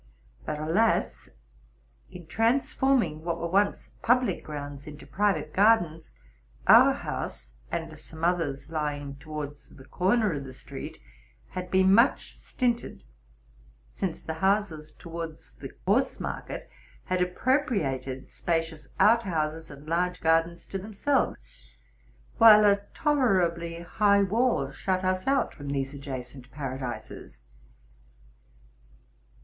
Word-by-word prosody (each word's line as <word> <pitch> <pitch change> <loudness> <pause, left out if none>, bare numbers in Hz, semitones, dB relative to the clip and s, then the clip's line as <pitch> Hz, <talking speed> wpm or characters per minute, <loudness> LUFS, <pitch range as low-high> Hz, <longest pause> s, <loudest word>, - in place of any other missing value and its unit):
But, 150 - -2
alas! 185 +9 +1 0.8
in 180 -2 -11
transforming 230 - +1
what 170 0 -2
were 170 - -2
once 200 +4 0
public 250 +1 +2
grounds 145 -2 -7
into 150 -1 -10
private 155 0 0
gardens, 175 -6 +3 0.6
our - - +8
house, - - -5 0.2
and 165 -1 -4
some 160 +1 -11
others 160 -4 -1
lying 145 -3 -3
towards 145 -1 -7
the 130 - -15
corner 205 +2 +1
of 140 -2 -4
the 130 -1 -9
street, - - -9 0.5
had 180 0 -6
been 190 +1 +4
much 230 +5 +3
stinted; 240 -2 -2 0.9
since 185 -4 -3
the 160 - -4
houses 190 -6 0
towards 165 - -8
the - - -9
horse - - +2
market - - -5 0.4
had 185 0 -1
appropriated 180 - -1
spacious 165 -3 -2
out 230 +2 +6
houses 160 -5 -2
and 140 +1 -12
large 180 +2 0
gardens 165 +1 +1
te 195 - -5
themselves, 220 +8 0 1.0
while 215 -2 +9
a 200 0 +4
tolerably 175 - +1
high 200 +3 +3
wall 200 - +1
shut 185 +6 -2
us 185 +2 0
out 275 0 +2
from 145 - -10
these 135 0 -2
adjacent 130 -2 -7
paradises. 130 - -7
170 Hz, 115 wpm, -27 LUFS, 150-200 Hz, 1.0 s, while